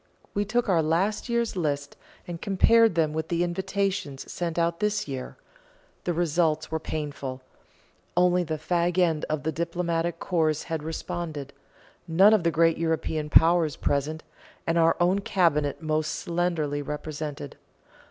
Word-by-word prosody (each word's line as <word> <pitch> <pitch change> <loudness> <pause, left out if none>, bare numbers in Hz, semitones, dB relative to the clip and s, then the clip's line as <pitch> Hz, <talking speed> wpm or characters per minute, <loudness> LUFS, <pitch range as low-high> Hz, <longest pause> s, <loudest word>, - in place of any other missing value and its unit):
We 205 +1 0
took 240 +3 0
our 175 -5 +3
last 185 +9 0
year's 235 -2 0
list, 145 -5 -2 0.3
and 170 -1 -6
compared 225 +1 +4
them 155 -2 +1
with 160 0 -2
the 170 0 0
invitations 190 -4 -2
sent 170 -2 -3
out 170 0 +1
this 210 -3 0
year. 130 -2 -6 0.7
The 175 - +1
results 160 -2 +1
were 160 - -1
painful; 140 -4 -5 0.8
only 180 0 +4
the 160 -2 -3
fag 175 +3 0
end 165 -4 +2
of 155 -3 -2
the 160 - 0
diplomatic 170 +1 -1
corps 160 -4 0
had 160 -2 -3
responded 155 -2 -5 0.5
none 190 +6 +6
of 215 - +4
the 170 - +2
great 165 0 +3
European 160 -2 -1
powers 165 -2 +4
present, 150 +3 -1 0.4
and 165 0 +1
our 165 0 +4
own 180 +3 +3
Cabinet 165 -7 +1
most 155 0 0
slenderly 170 -4 -1
represented. 150 -1 -5
165 Hz, 145 wpm, -26 LUFS, 155-175 Hz, 0.8 s, none